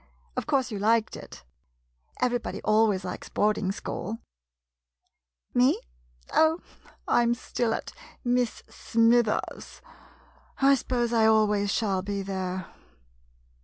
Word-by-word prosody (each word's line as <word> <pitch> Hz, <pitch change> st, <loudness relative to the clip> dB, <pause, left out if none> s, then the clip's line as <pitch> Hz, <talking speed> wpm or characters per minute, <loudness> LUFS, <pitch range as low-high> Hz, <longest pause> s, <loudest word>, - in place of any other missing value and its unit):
Of -, -, -3 dB
course, 265 Hz, -4 st, +1 dB
you 205 Hz, -, -4 dB
liked 220 Hz, +2 st, +2 dB
it? -, -, -11 dB, 0.8 s
Everybody 245 Hz, -1 st, -1 dB
always 215 Hz, -3 st, +3 dB
likes 180 Hz, -, -6 dB
boarding 210 Hz, -2 st, +1 dB
school? 210 Hz, +2 st, -5 dB, 1.4 s
Me? 250 Hz, +2 st, +4 dB, 0.5 s
Oh, 320 Hz, +1 st, +4 dB, 0.5 s
I -, -, +4 dB
'm 235 Hz, 0 st, +2 dB
still 240 Hz, -1 st, -2 dB
at -, -, -7 dB, 0.3 s
Miss 245 Hz, -2 st, 0 dB
Smithers' 230 Hz, -1 st, +1 dB, 0.4 s
— -, -, -29 dB, 0.3 s
I 275 Hz, 0 st, +5 dB
suppose 240 Hz, -2 st, 0 dB
I 225 Hz, -1 st, +4 dB
always 210 Hz, -2 st, +3 dB
shall 195 Hz, -5 st, 0 dB
be 200 Hz, +1 st, -3 dB
there. 185 Hz, -1 st, -3 dB
225 Hz, 115 wpm, -27 LUFS, 205-245 Hz, 1.4 s, I